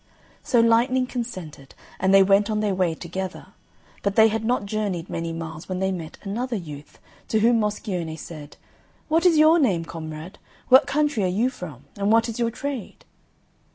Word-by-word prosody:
So 240 - +2
Lightning 240 +3 +3
consented, 185 - -7 0.2
and 190 +1 +2
they 195 0 +7
went 200 +2 +3
on 215 -1 0
their 210 -2 0
way 180 -3 0
together; 185 +3 -6 0.5
but 200 0 -1
they 220 0 +7
had 220 +1 -2
not 240 -1 0
journeyed 200 -5 -3
many 165 0 -3
miles 165 0 -7
when 185 - -2
they 190 +1 0
met 165 -3 -6
another 235 +5 -3
youth, 150 -7 -8 0.3
to 220 - +1
whom 230 +1 +4
Moscione 190 -6 -3
said, 150 -2 -10 0.5
"What 330 +3 +4
is 335 -3 +4
your 315 +2 +6
name, 190 - +1
comrade? 160 +2 -8 0.3
What 260 +3 +7
country 290 -6 +1
are - - +2
you 220 +8 +1
from? 150 - -9
And 200 +1 +1
what 230 +1 +4
is 230 0 -5
your 235 -1 +1
trade?" 275 - -6
200 Hz, 180 wpm, -24 LUFS, 170-235 Hz, 0.5 s, they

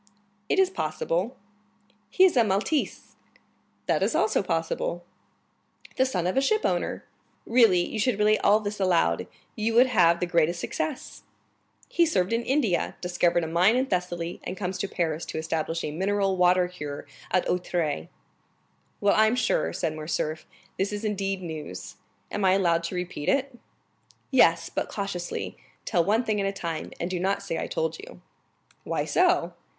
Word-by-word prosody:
"It - - +2
is 380 -1 +4
possible." 170 - -2 0.7
"He 370 - +4
is 375 -5 +5
a 240 - +5
Maltese." 215 +9 -1 0.7
"That - - +1
is - - +1
also - - +2
possible. - - -2 0.9
"The 260 - +3
son 180 -9 -2
of 180 - 0
a 270 - +3
shipowner." 435 +10 0 0.4
"Really, 220 -7 +4
you 220 - -4
should 225 -1 +1
relate 210 0 +3
all 210 +1 +5
this 210 -1 -5
aloud, 185 -3 +2 0.3
you 225 0 -1
would 245 +2 +7
have 175 -9 +4
the - - 0
greatest 170 0 +1
success." 285 - -4 0.7
"He 340 -1 +2
served 185 - +1
in 230 - +1
India, 240 -8 0
discovered 175 -1 +1
a - - -2
mine 180 +7 +4
in 260 +1 +2
Thessaly, 175 -5 -3
and 185 - -5
comes 185 -1 -3
to 200 - -1
Paris 165 -4 -2
to - - -5
establish 160 +1 -2
a 150 - -3
mineral 195 +3 0
water 180 0 +4
cure 150 -5 -7 0.2
at 185 - +1
Auteuil." 175 - -1 0.9
"Well, 200 0 +4
I'm 220 +2 +4
sure," 225 -3 +1
said 165 -3 -2
Morcerf, 155 0 -3 0.3
"this 195 +2 0
is 210 +1 -4
indeed 195 -2 -2
news! 155 - -7 0.3
Am 205 - -2
I 185 -1 +5
allowed 170 -3 +2
to 175 - -4
repeat 180 -4 -3
it?" 275 -1 0 0.8
"Yes, - - +4
but - - -3
cautiously, 195 -4 -4 0.3
tell 175 -5 +2
one 215 +7 +2
thing 215 -3 0
at 195 - 0
a - - 0
time, 170 -5 -5
and 170 - -2
do 185 -1 -3
not 195 +2 0
say 170 -4 -3
I - - -3
told 160 0 -2
you." - - -12 0.6
"Why - - -2
so?" - - +2
185 Hz, 165 wpm, -26 LUFS, 170-220 Hz, 0.9 s, would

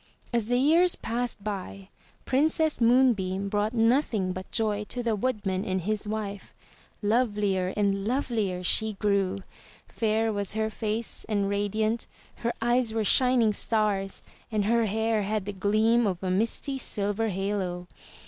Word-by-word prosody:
As 235 -3 +1
the 245 +1 +2
years 330 +7 +4
passed 235 -3 -3
by. 195 -1 -5 0.4
Princess 310 +1 +1
Moonbeam 215 -6 +3
brought 205 +1 0
nothing 225 -5 +2
but 185 +1 -7
joy 210 -2 0
to 245 +3 -4
the 230 -2 +1
woodman 205 -4 -1
and 185 -2 -1
his 210 +3 -2
wife. 210 -2 -5 0.5
Lovelier 205 -4 +1
and 200 -1 +1
lovelier 220 -8 -1
she 220 +4 +2
grew. 200 -1 0 0.4
Fair 220 0 0
was 205 0 -1
her 220 0 0
face 220 +1 -3
and 200 -2 +1
radiant, 215 +3 -1 0.3
her 235 0 -2
eyes 240 -1 +2
were 220 - +1
shining 250 -2 +4
stars, 205 -3 -1 0.3
and 210 -2 0
her 230 +1 +2
hair 220 +1 0
had 205 0 -2
the 205 - -4
gleam 215 +4 +2
of 185 -1 -3
a 185 - 0
misty 230 +7 0
silver 205 -1 -2
halo. 190 -2 -2
215 Hz, 145 wpm, -27 LUFS, 200-230 Hz, 0.5 s, years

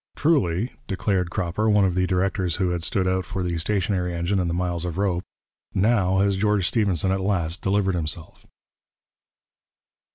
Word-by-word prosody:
'Truly,' 125 - +1 0.2
declared 95 -2 0
Cropper, 90 +5 -1
one 105 -2 +4
of 95 - +1
the 90 +1 +1
directors 90 -1 0
who 95 -3 0
had 85 -1 -2
stood 95 +3 0
out 95 0 +1
for 95 - -4
the 90 -1 -1
stationary 90 -1 0
engine 85 +4 0
and 90 -2 0
the - - -1
miles 90 -1 -1
of 90 -1 -4
rope, 95 -3 0 0.5
'now 95 -2 +2
has 100 0 +2
George 105 -2 +2
Stephenson 95 -5 +1
at 95 0 0
last 90 -4 -1
delivered 95 0 +1
himself.' 80 -1 -5
95 Hz, 165 wpm, -24 LUFS, 90-100 Hz, 0.5 s, one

